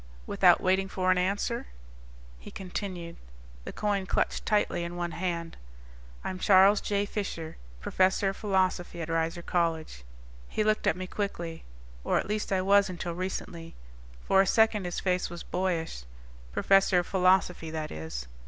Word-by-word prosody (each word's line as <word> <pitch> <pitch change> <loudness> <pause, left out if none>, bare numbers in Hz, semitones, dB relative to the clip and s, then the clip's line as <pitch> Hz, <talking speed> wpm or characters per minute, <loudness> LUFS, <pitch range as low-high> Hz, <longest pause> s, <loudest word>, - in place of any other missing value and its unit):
Without - - +5
waiting 190 +1 +1
for 185 -1 +1
an 185 - +3
answer, 200 +6 -1 0.7
he - - -11
continued, 180 -3 -6 0.5
the - - -5
coin 200 -2 -1
clutched - - -1
tightly 210 -5 +1
in 170 +1 -5
one 175 -1 -3
hand. 170 -2 -3 0.7
"I'm 185 - -4
Charles 195 +1 +6
J. 205 0 0
Fisher, 195 -6 -5 0.2
professor 190 - +2
of 195 - -4
philosophy 185 -4 0
at 160 - -6
Reiser 165 +1 -1
College." 160 - -1 0.5
He 215 - 0
looked 215 0 +1
at 160 - +2
me 185 - -4
quickly. 175 -4 -4 0.4
"Or - - +1
at - - -1
least 210 0 -2
I 185 -1 +1
was 200 0 +4
until 175 -1 -4
recently." 170 -2 -5 0.5
For 195 - +5
a 195 - +1
second 220 -3 +3
his 175 - -3
face 180 -1 0
was 175 0 -7
boyish. 170 - -2 0.5
"Professor 195 - +4
of 175 - +2
philosophy, 185 -3 +2
that 155 -1 -4
is." 75 -6 -6
185 Hz, 155 wpm, -28 LUFS, 170-195 Hz, 0.7 s, Charles